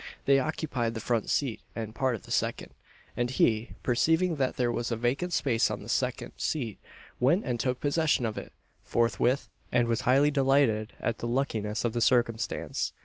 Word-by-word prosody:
They 135 0 +5
occupied 130 -5 -2
the - - -3
front 115 -1 -1
seat 130 -6 0
and 110 -1 -5
part 130 0 0
of 110 - -10
the - - -12
second; - - -1 0.4
and 120 0 0
he, 115 -3 +1
perceiving 160 +7 +2
that 130 -2 0
there 120 -1 +1
was 120 0 -2
a - - +1
vacant 130 +10 -1
space 120 -8 +2
on - - -4
the - - -10
second - - -1
seat, 120 -9 -2 0.4
went 155 - +3
and 120 -2 -2
took 125 +1 -1
possession 150 -3 +1
of 110 -1 -2
it - - -7 0.3
forthwith, 120 +3 +1 0.2
and 120 -1 +3
was 115 +2 0
highly 140 +4 +4
delighted 135 -6 +2
at 115 0 -2
the 120 - -3
luckiness 115 -4 -1
of 115 - 0
the 120 - -1
circumstance. 115 -2 0
120 Hz, 185 wpm, -28 LUFS, 115-140 Hz, 0.4 s, They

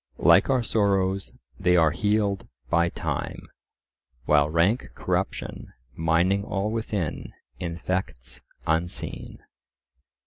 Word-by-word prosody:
Like 85 +7 +5
our 130 -3 +2
sorrows, 100 -3 +1 0.3
they 90 -2 +4
are 80 -2 +5
healed 105 +2 0 0.2
by 85 0 +3
time; - - -4 0.8
"While 75 +1 +4
rank 85 +9 +2
corruption, - - -3 0.2
mining 85 +5 +2
all 100 +1 -2
within, 105 -8 -3 0.3
Infects 85 -7 -4 0.2
unseen." 80 +2 -2
90 Hz, 95 wpm, -26 LUFS, 85-100 Hz, 0.8 s, Like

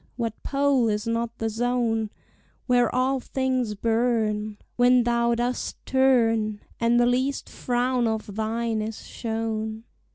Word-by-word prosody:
what 230 -3 -2
pole 275 -3 +2
is 210 +1 -1
not 230 0 -2
the 225 - -1
zone 225 -1 0 0.6
Where 245 -2 +3
all 260 +1 +1
things 255 -4 -1
burn, 220 -2 0 0.2
When 245 0 +5
thou 235 0 +2
dost 245 +1 -2
turn, 225 -5 +2 0.2
And 235 +1 +3
the 240 - +4
least 260 +3 0
frown 245 0 0
of 220 -2 -3
thine 225 0 -1
is 220 0 -6
shown? 220 -1 -3
235 Hz, 130 wpm, -25 LUFS, 220-250 Hz, 0.6 s, When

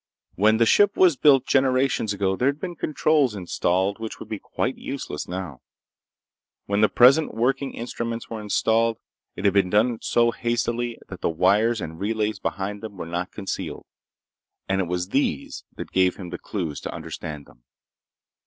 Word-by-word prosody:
When 110 +3 +3
the 115 - +4
ship 205 - +4
was 180 -5 +5
built, 135 -1 +5
generations 130 -4 +2
ago, 95 -1 0
there'd 140 +7 0
been 175 0 -5
controls 150 -6 +1
installed 95 +2 0
which 110 -1 -6
would - - -10
be 110 - -4
quite 130 +2 -2
useless 135 - -5
now. 90 -7 -6 1.0
When 100 +1 0
the 110 - +5
present 135 +6 +5
working 135 +4 0
instruments 115 0 -4
were 110 -1 -6
installed, 115 +2 +1 0.4
it 95 - -5
had 100 - +4
been 100 -2 +3
done 110 +4 +2
so 120 0 +2
hastily 120 0 -1
that 95 -3 -9
the - - +1
wires 100 +8 +2
and 80 +1 -6
relays 105 0 -1
behind 100 +1 -3
them 110 -3 -8
were 90 - -5
not 85 +3 -4
concealed, 100 -2 -5 0.8
and 95 0 +1
it 90 - -2
was 90 +1 -2
these - - -1
that - - -7
gave 95 -1 +3
him 90 -3 -8
the - - -5
clues 85 -8 -4
to - - -5
understand 75 -2 -7
them. - - -21
110 Hz, 170 wpm, -24 LUFS, 95-120 Hz, 1.0 s, was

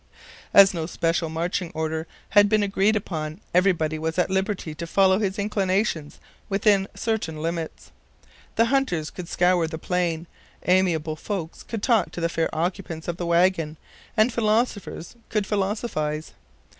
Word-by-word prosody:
As 195 -1 +8
no 165 -2 -3
special 165 -1 0
marching 170 +2 -2
order 160 0 -2 0.2
had 205 -1 +6
been 215 -1 +3
agreed 200 +2 +2
upon, 160 -5 -3
everybody 170 -4 +2
was 160 +1 -2
at 180 +1 +1
liberty 190 -4 -1
to 170 +2 -6
follow 190 +2 +4
his 195 -2 -1
inclinations 195 -6 -1 0.3
within 195 -1 +3
certain 210 -9 -2
limits. 165 0 -4 0.6
The 230 - +4
hunters 180 - +1
could 180 -2 -7
scour 175 -2 +3
the 160 0 -5
plain, 170 -1 -1 0.4
amiable 170 -4 +2
folks 175 -3 -5
could 225 -3 -6
talk 235 -4 +3
to - - -5
the 170 0 0
fair 165 0 0
occupants 170 -1 -3
of 170 -1 -2
the 175 - -3
wagon, 170 -2 +2 0.4
and 220 +3 +4
philosophers 215 -4 -1
could 210 -2 0
philosophize. 190 -7 -2
180 Hz, 145 wpm, -24 LUFS, 160-200 Hz, 0.6 s, As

